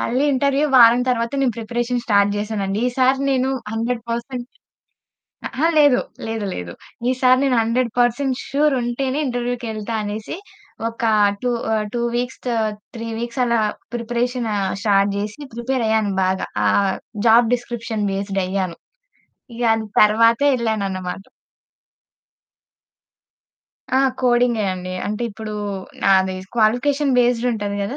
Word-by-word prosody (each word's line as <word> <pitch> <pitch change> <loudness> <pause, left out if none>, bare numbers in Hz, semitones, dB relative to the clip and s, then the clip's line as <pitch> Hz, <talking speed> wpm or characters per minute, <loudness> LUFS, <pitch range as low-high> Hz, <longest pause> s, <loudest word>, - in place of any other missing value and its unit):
మళ్ళీ 255 +4 0
ఇంటర్వ్యూ 280 +2 +2
వారం 235 0 +7
తరువాత 235 -1 0
నేను 255 -4 +1
ప్రిపరేషన్ 240 +2 -2
స్టార్ట్ 200 -3 +3
చేశానండి. 205 -1 -2
ఈసారి 260 +1 +2
నేను 260 -1 +1 0.2
100% 235 +2 -3 1.0
అహా! 310 +5 0
లేదు, 290 -4 +6 0.3
లేదు, 225 -2 -3
లేదు. 90 -1 -6 0.4
ఈసారి 255 0 +4
నేను 265 -2 +2
100% 245 +3 +1
ష్యూర్ 295 +1 +2
ఉంటేనే 260 +3 -2
ఇంటర్వ్యూకెళ్తా 240 -3 -3
అనేసి 210 +5 -5 0.5
ఒక 230 +2 -9 0.4
2 250 - 0 0.2
ఆహ్, 215 -1 +1
2 240 - -1
వీక్స్, 245 +1 -3 0.6
3 230 0 -5
వీక్స్ 240 +2 -3
అలా 235 -1 +2 0.4
ప్రిపరేషన్ 240 0 -2 0.3
స్టార్ట్ 200 -1 +2
జేసి 210 +7 -5
ప్రిపేరయ్యాను. 230 -4 0
బాగా 190 +1 0 0.2
ఆ - - +4 0.6
జాబ్ 230 +1 +5
డిస్క్రిప్షన్ 230 -3 -4
బేస్డ్ 195 0 -2
అయ్యాను. 185 -2 -2 0.8
ఇగ 240 - -5
అది 225 0 -3 0.2
తరువాతే 230 +5 +5
యెళ్ళానన్నమాట. 195 -6 -2 2.7
ఆ! - - +5 0.2
కోడింగే 240 -3 +2
అండి. 185 0 -6
అంటే 210 +3 -3
ఇప్పుడు 215 0 -7 0.5
నాది 190 -1 +3 0.2
క్వాలిఫికేషన్ 260 +5 +2
బేస్డ్ 245 0 +2
ఉంటది 205 -2 -3
గదా! 205 +8 -4
235 Hz, 115 wpm, -20 LUFS, 210-250 Hz, 2.7 s, వారం